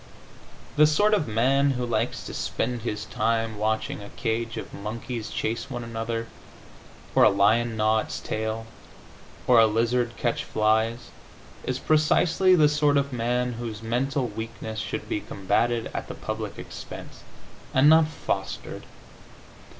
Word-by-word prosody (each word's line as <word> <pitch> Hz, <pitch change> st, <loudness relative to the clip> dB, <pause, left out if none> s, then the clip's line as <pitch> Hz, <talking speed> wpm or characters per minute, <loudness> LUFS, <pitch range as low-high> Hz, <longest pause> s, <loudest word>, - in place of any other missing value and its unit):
The 150 Hz, 0 st, +7 dB
sort 205 Hz, +8 st, +3 dB
of 200 Hz, -10 st, +2 dB
man 135 Hz, +5 st, +3 dB
who 125 Hz, -, -1 dB
likes 115 Hz, 0 st, -1 dB
to -, -, -7 dB
spend 120 Hz, 0 st, -2 dB
his 105 Hz, -2 st, -3 dB
time 115 Hz, -1 st, -1 dB
watching 110 Hz, 0 st, -1 dB
a 100 Hz, -, -9 dB
cage 115 Hz, 0 st, -2 dB
of -, -, -7 dB
monkeys 115 Hz, +2 st, -5 dB
chase 115 Hz, +5 st, -3 dB
one 120 Hz, -3 st, -4 dB
another, 115 Hz, 0 st, -3 dB, 0.9 s
or -, -, +4 dB
a -, -, +8 dB
lion 110 Hz, +4 st, +2 dB
gnaw 110 Hz, 0 st, +3 dB
its -, -, -4 dB
tail, 110 Hz, +1 st, -3 dB, 0.8 s
or 125 Hz, -2 st, +6 dB
a 110 Hz, -, +7 dB
lizard 115 Hz, +2 st, 0 dB
catch 120 Hz, -1 st, -1 dB
flies, 110 Hz, +2 st, 0 dB, 0.5 s
is -, -, -1 dB
precisely 165 Hz, +4 st, +3 dB
the 155 Hz, -4 st, +6 dB
sort 150 Hz, -1 st, +3 dB
of 140 Hz, -1 st, 0 dB
man 125 Hz, +1 st, 0 dB
whose 115 Hz, -2 st, -6 dB
mental 130 Hz, +4 st, 0 dB
weakness 110 Hz, 0 st, -6 dB
should -, -, -4 dB
be -, -, -1 dB
combatted 110 Hz, +4 st, 0 dB
at -, -, -4 dB
the -, -, -7 dB
public -, -, -5 dB
expense, -, -, -9 dB, 0.5 s
and 130 Hz, +2 st, +5 dB
not 160 Hz, 0 st, +7 dB
fostered. 100 Hz, -10 st, -4 dB
115 Hz, 145 wpm, -26 LUFS, 110-130 Hz, 0.9 s, a